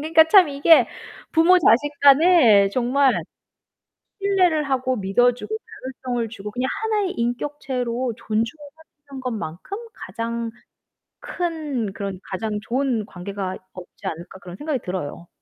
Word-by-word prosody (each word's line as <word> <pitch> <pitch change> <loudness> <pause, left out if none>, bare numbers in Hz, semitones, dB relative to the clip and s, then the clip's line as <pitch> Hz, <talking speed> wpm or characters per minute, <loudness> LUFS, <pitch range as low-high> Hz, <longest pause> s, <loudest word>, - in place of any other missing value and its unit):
그러니까 320 +1 +5
참 365 -3 +7
이게 285 +3 +5 0.5
부모 345 +3 +5
자식 290 -3 +3
간에 275 - +6
정말 255 +3 +2 1.0
신뢰를 365 -6 +2
하고 255 0 0
믿어주고 245 - +1 0.3
자율성을 250 -3 -4
주고 210 -1 -8
그냥 250 +3 -2
하나의 425 -4 0
인격체로 245 -1 -3
존중하는 285 +5 -6
것만큼 225 - -5 0.2
가장 230 +3 -5 0.7
큰 300 - -3
그런 195 -2 -5
가장 210 +2 -3
좋은 245 -2 -1
관계가 190 0 -5 0.2
없지 180 -1 -12
않을까 170 +3 -6
그런 180 -1 -10
생각이 295 +1 -2
들어요. 175 -2 -5
250 Hz, 275 characters per minute, -22 LUFS, 210-300 Hz, 1.0 s, 참